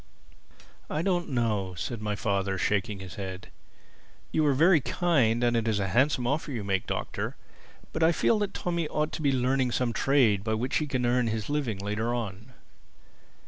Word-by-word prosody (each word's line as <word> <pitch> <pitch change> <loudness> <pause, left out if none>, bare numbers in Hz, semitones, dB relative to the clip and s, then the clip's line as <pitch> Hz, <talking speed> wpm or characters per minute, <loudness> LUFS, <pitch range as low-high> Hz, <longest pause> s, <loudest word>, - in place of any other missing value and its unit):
"I 155 - -1
don't 175 -3 0
know," 105 -8 -1
said 105 +7 -4
my 105 -1 -2
father, 100 -2 -1
shaking 105 +3 0
his 95 -2 -9
head. 95 -1 -6 0.8
"You 155 - +2
are 140 - +3
very 165 +2 +5
kind 125 -9 +2
and 120 0 +3
it 115 -1 0
is 110 -2 +1
a 95 -1 -1
handsome 130 +5 +2
offer 145 +4 -1
you 115 -6 -3
make, 95 -2 -1
Doctor. - - -3 0.6
But 160 - -3
I 160 +1 +5
feel 210 +6 +2
that 205 -1 -2
Tommy 170 -2 -1
ought 150 +1 -1
to - - -5
be 140 -2 +3
learning 130 -1 +1
some 120 -2 0
trade 120 -9 +3
by 110 0 0
which 125 +4 0
he 155 - -1
can 130 -3 -1
earn 120 0 +2
his 110 +3 -2
living 140 -9 -1
later 105 +4 -2
on." 110 +1 -5
120 Hz, 185 wpm, -28 LUFS, 105-145 Hz, 0.8 s, very